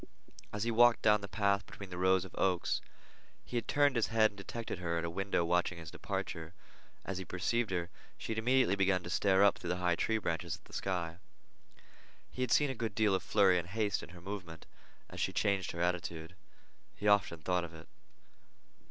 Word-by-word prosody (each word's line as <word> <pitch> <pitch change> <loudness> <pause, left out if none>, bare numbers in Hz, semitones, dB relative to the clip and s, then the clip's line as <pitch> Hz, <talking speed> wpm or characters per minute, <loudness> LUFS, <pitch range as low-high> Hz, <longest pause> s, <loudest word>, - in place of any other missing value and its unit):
As 105 0 -3
he 120 - 0
had 110 - -4
walked 120 0 +6
down 105 -1 +5
the 100 - -6
path 100 -1 +1
between 100 -2 -10
the 90 - -6
rows 95 0 +3
of 95 - -12
oaks, 90 -2 +1 0.6
he - - -8
had 115 -2 -1
turned 145 -2 +3
his 115 - +2
head 110 -1 +3
and - - -19
detected 110 -1 -5
her 85 -1 -1
at 85 - -1
a 85 - -3
window 95 -1 0
watching 90 +1 +1
his 85 -2 -9
departure. 80 +1 -5 0.5
As 95 -1 -3
he - - -4
perceived 110 +6 -1
her, 90 -1 -2 0.3
she - - -6
had 110 - -1
immediately 125 -3 +3
begun 95 -2 +2
to 90 - -6
stare 95 0 +3
up 100 - +4
through - - -7
the 90 - +1
high 90 -1 +2
tree 110 +5 0
branches 80 -7 -2
at - - -21
the - - -17
sky. 85 -3 -2 1.1
He 130 - -6
had 125 - 0
seen 145 -2 +4
a - - -3
good 115 -4 -4
deal 110 -3 +3
of 95 - +1
flurry 95 -4 +4
and 85 - -6
haste 105 +1 -1
in - - -10
her 90 -1 -12
movement 90 -4 -7 0.4
as - - -9
she - - 0
changed 100 -4 +1
her 85 - -5
attitude. 85 -1 -2 0.6
He 105 - -3
often 100 -6 +3
thought 90 -1 +1
of 85 -1 -8
it. 80 +1 -12
95 Hz, 215 wpm, -33 LUFS, 90-110 Hz, 1.1 s, walked